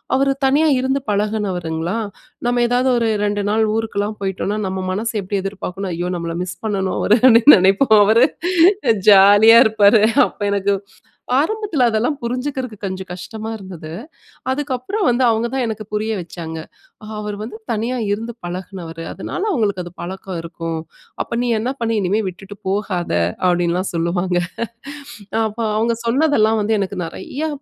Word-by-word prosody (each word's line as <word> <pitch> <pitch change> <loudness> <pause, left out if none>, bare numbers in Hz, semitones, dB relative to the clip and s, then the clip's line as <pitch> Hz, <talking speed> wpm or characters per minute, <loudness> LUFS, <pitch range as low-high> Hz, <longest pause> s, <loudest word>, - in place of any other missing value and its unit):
அவரு 275 +1 +2
தனியா 285 +4 +3
இருந்து 265 +2 0
பழகினவருங்களா! 195 -5 -1 0.5
நம்ப 245 0 +1
ஏதாவது 250 +2 +2
ஒரு 230 -1 +1 0.2
2 205 0 0
நாள் 220 +1 +2
ஊருக்குலாம் 215 -1 -2
போயிட்டோன்னா, 195 +1 -2
நம்ப 190 0 -3
மனச 220 +4 -2
எப்பிடி 195 +1 -2
எதிர்பார்க்குன்னா, 195 -1 -5
ஐயோ! 175 +1 -3
நம்பள 170 -1 -4
மிஸ் 185 0 -7
பண்ணணும் 195 -3 -1
அவரு. 210 - +4
அப்பிடீன்னு 250 +2 +8
நினைப்போம். 195 +6 +4
அவரு 225 +4 +5 0.8
ஜாலியா 205 +3 +8
இருப்பாரு. 215 0 +5 0.2
அப்ப - - -12
எனக்கு 200 0 +1 0.6
ஆரம்பத்துல 355 - 0
அதெல்லாம் 230 +7 0
புரிஞ்சுக்குறது 250 -1 -3
கொஞ்சம் 190 -1 -5
கஷ்டமா 220 +5 -7
இருந்தது. 180 -6 -9 0.6
அதுக்கப்பறம், 290 - -2
வந்து 245 +2 +1
அவுங்க 225 0 +1
தான் 265 - 0
எனக்கு 220 -1 -4
புரிய 215 +1 -1
வச்சாங்க. 165 -2 -7 0.6
அவரு 210 -1 -4
வந்து 220 0 -7 0.2
தனியா 230 +3 -2 0.2
இருந்து 230 +3 -3
பழகினவரு. 175 -2 -7
அதுனால 365 - -5
அவுங்களுக்கு 210 - 0
அது 175 - -9
பழக்கம் 190 0 -6
இருக்கும். 165 -1 -5 0.4
அப்ப 235 - -5
நீ 245 - -1
என்ன 235 +4 -2
பண்ணி, 230 -1 0
இனிமே 195 +4 +1
விட்டுட்டு 195 +3 -10
போகாத! 190 -3 -2 0.3
அப்பிடீன்லாம் 175 +1 +1
சொல்லுவாங்க. 175 +2 0 1.0
அ - - +2
அப்ப 215 +1 -7 0.2
அவுங்க 230 +1 +1
சொன்னதெல்லாம் 230 -4 +3
வந்து 215 +2 +1
எனக்கு 195 0 -3
நெறையா, 285 - -5
210 Hz, 145 wpm, -19 LUFS, 185-235 Hz, 1.0 s, அப்பிடீன்னு